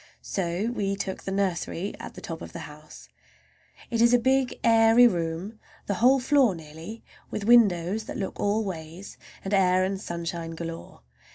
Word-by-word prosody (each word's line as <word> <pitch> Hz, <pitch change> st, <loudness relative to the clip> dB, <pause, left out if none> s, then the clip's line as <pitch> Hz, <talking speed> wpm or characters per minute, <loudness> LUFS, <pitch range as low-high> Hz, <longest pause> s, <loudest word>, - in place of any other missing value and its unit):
So 190 Hz, +4 st, -2 dB
we 200 Hz, -4 st, -1 dB
took 195 Hz, -1 st, -4 dB
the 195 Hz, -, -5 dB
nursery, 190 Hz, -1 st, -2 dB
at -, -, -9 dB
the -, -, -9 dB
top 165 Hz, -1 st, -7 dB
of -, -, -9 dB
the 170 Hz, -, -6 dB
house. 150 Hz, +1 st, -13 dB, 0.8 s
It 230 Hz, -1 st, +1 dB
is 235 Hz, +1 st, +6 dB
a -, -, +6 dB
big, 260 Hz, +1 st, +1 dB
airy 225 Hz, +1 st, +6 dB
room, 175 Hz, +2 st, -3 dB, 0.3 s
the 200 Hz, -, -1 dB
whole 260 Hz, +3 st, +6 dB
floor 260 Hz, -5 st, +3 dB
nearly, 160 Hz, +7 st, -10 dB, 0.3 s
with 210 Hz, -, -4 dB
windows 210 Hz, -3 st, +4 dB
that -, -, -6 dB
look 195 Hz, -, -5 dB
all 210 Hz, +2 st, +1 dB
ways, 170 Hz, +1 st, -8 dB, 0.3 s
and 195 Hz, -, -3 dB
air 185 Hz, -1 st, +4 dB
and 190 Hz, +1 st, -2 dB
sunshine 170 Hz, -2 st, -5 dB
galore. 165 Hz, -, -8 dB
195 Hz, 170 wpm, -26 LUFS, 170-225 Hz, 0.8 s, is